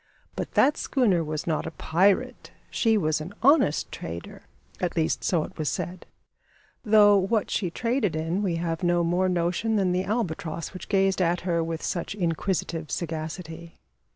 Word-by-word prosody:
But - - -5
that 290 - +4
schooner 205 - +1
was 155 0 -4
not 155 -3 -1
a - - -8
pirate. 190 +4 +1 0.2
She 225 -2 +2
was 155 -5 0
an 175 +6 -8
honest 275 - +4
trader 85 +1 -8 0.3
at 180 - -2
least 160 -2 0
so 170 -4 +1
it - - -10
was 155 - 0
said 180 0 -5 0.8
though 210 -2 +6
what 200 +3 +1
she 185 - 0
traded 230 - -1
in 165 +5 -1
we 185 -5 0
have 165 +1 -2
no 175 -1 +2
more 180 +2 +1
notion 180 +5 0
than 190 -3 +2
the 180 +1 0
albatross 180 -6 -3
which 185 - -9
gazed 195 -1 +2
at 175 0 +1
her 170 -2 0
with 165 0 -4
such 175 +3 -3
inquisitive 165 -3 -2
sagacity. 165 +1 -5
175 Hz, 165 wpm, -26 LUFS, 165-200 Hz, 0.8 s, though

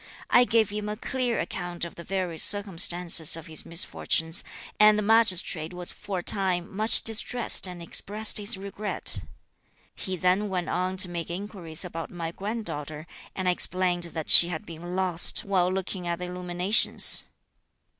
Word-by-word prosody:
I 245 - +5
gave 225 -3 +1
him 210 0 -5
a 210 - -5
clear 250 0 -3
account 175 -1 -5
of 170 - -9
the 170 - -11
various 180 -3 -4
circumstances 175 -5 +3
(of 165 -1 -9
his 160 -3 -6
misfortunes), 165 0 0 0.4
and 210 0 +6
the 210 - -1
Magistrate 190 -6 +1
was 180 0 -5
for 195 -2 -7
a 175 - -5
time 185 -2 -1
much 215 +2 +4
distressed 225 -1 +2
and 180 -2 -9
expressed 210 +5 +1
his 205 0 0
regret. 200 +2 -2 0.7
He 185 -2 -5
then 185 +4 0
went 180 -2 -3
on 185 +1 -2
to 185 - +3
make 170 -1 -6
inquiries 180 -3 -6
about 165 -2 -7
my 165 -2 -6
grand 215 +5 -6
daughter, 150 -1 -7 0.3
and 185 -1 -4
I - - +4
explained 180 -1 0
that 160 -2 -7
she 170 - +9
had 160 -3 -6
been 175 +2 -9
lost, 185 -3 +1
while 185 -2 0
looking 185 -1 -5
at 170 0 -2
the 180 - -6
illuminations. 180 +3 +3
180 Hz, 165 wpm, -25 LUFS, 170-205 Hz, 0.7 s, she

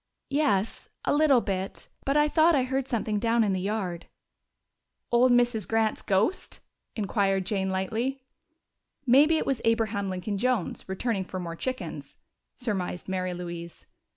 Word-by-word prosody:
"Yes, 250 -8 0 0.2
a - - +2
little 290 -4 +5
bit. 190 -2 -4 0.2
But 275 +2 +2
I 295 0 +5
thought 320 +2 +4
I 265 - +3
heard 265 +1 -1
something 215 -4 -1
down 230 +1 +2
in 200 -2 +1
the 185 - -1
yard." 190 -4 -3 1.0
"Old 245 +1 +5
Mrs. 240 -4 +2
Grant's 225 -1 +1
ghost?" 200 - 0 0.4
inquired 195 -3 0
Jane 190 -1 -1
lightly. 230 +8 -2 0.8
"Maybe 290 +6 +6
it - - -1
was 270 -4 -1
Abraham 225 -3 +1
Lincoln 190 +2 -3
Jones, 245 -6 -1
returning 195 +1 -1
for 185 - -5
more 170 -2 -5
chickens," 255 +8 -5 0.4
surmised 195 -7 -3
Mary 185 -1 -2
Louise. 170 -1 -7
220 Hz, 145 wpm, -27 LUFS, 190-255 Hz, 1.0 s, Maybe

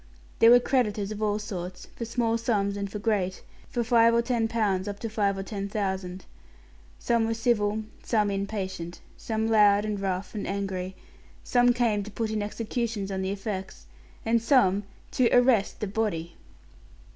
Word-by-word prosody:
There 230 - +8
were 245 +1 +9
creditors 215 -6 0
of 215 0 -5
all 210 -1 +1
sorts; 185 -4 -6
for 235 - -4
small 230 0 0
sums 210 -4 0
and 200 -1 -4
for 210 - -4
great, 200 -4 -1 0.3
for 240 - -1
five 230 0 +5
or 235 - +3
ten 235 -2 +1
pounds 210 -4 0
up 205 0 -4
to 225 - -3
five 205 -2 0
or 195 - -3
ten 200 0 -5
thousand. 190 -3 -3 0.7
Some 230 -1 +1
were 225 - -1
civil, 220 -2 +1 0.2
some 210 -3 +1
impatient, 190 -4 -4 0.2
some 220 -1 -2
loud 210 -2 +5
and 210 -1 -2
rough 190 -1 -3
and 210 - -4
angry; 190 -2 -3 0.5
some 245 0 +4
came 235 -4 +1
to 205 - -7
put 220 +1 -3
in 215 -1 -1
executions 215 -1 -3
on 190 -1 -2
the 190 - -1
effects, 195 - -5 0.4
and 230 0 +2
some 205 -5 +3 0.3
to 250 -2 +3
arrest 245 -5 +3
the - - 0
body! 195 -5 -2
210 Hz, 170 wpm, -27 LUFS, 195-230 Hz, 0.7 s, were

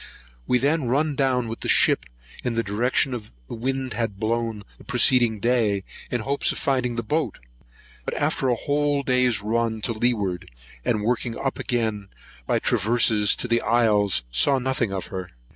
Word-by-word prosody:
We 125 - +3
then 145 +3 +1
run 145 +5 +1
down 130 -3 0
with 115 +1 -5
the - - -5
ship - - +4 0.4
in 120 -2 -2
the 115 - +1
direction 120 +6 +1
the 65 - -8
wind 130 +1 -3
had 105 -3 -3
blown 115 -1 -2 0.2
the - - -14
preceding 125 -3 +3
day, 110 -4 +1 0.3
in 120 - -2
hopes 140 +5 +1
of - - -5
finding 130 -3 0
the 115 - -2
boat; 140 -1 -1 0.7
but - - -4
after 130 - 0
a 120 - +2
whole 145 +3 0
day's 125 -5 +2
run 115 +1 0
to 115 - -1
leeward, 105 -6 -1 0.3
and 105 - 0
working 120 +1 -1
up 135 - -3
again 110 -5 -2 0.4
by - - +2
traverses 110 -2 +3
to - - -3
the 115 0 +2
isles, 105 - +3
saw 135 - +4
nothing 130 -4 -1
of 95 -1 -3
her. 95 -2 -5
120 Hz, 170 wpm, -24 LUFS, 105-130 Hz, 0.7 s, ship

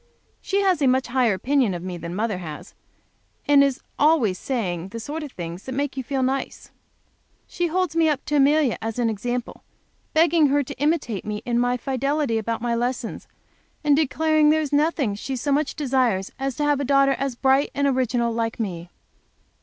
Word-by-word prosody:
She 395 +1 0
has 375 -5 +2
a 275 - +4
much 255 +1 +2
higher 245 -5 +2
opinion 250 -2 +1
of 175 - -6
me 185 -1 -5
than 170 0 -6
mother 210 -2 -1
has, 155 -4 -8 0.7
and 285 -1 +6
is 275 -2 0 0.2
always 285 - +3
saying 185 -9 -3
the 230 +4 -7
sort 295 +8 -5
of 295 -3 -7
things 170 -1 -7
that 260 - -5
make 280 +1 -2
you 265 - -2
feel 265 +1 -1
nice. 265 +1 -3 0.7
She 350 0 -2
holds 360 -1 -1
me 325 -1 +4
up 285 -3 -2
to 295 - 0
Amelia 285 -2 +3
as 225 +1 -4
an 235 -2 +1
example, 240 +3 -4 0.5
begging 325 -1 +4
her 285 +1 +2
to 255 - -9
imitate 290 - 0
me 210 0 -5
in 240 -1 +1
my 245 +1 +1
fidelity 275 -1 -1
about 230 +1 -3
my 240 -1 0
lessons, 240 0 -3 0.6
and 295 -1 +4
declaring 310 +1 +2
there 310 +1 +4
is 295 -2 -4
nothing 290 -6 +1
she 260 +6 -5
so 280 +3 -2
much 285 +1 0
desires 250 -9 0
as 270 -1 -2
to 295 - -2
have 290 -1 +2
a - - -1
daughter 275 0 +3 0.2
bright 270 +1 +3
and 280 - +1
original 245 -3 0
like 230 0 -2
me. 175 -5 -4
265 Hz, 195 wpm, -23 LUFS, 230-290 Hz, 0.7 s, and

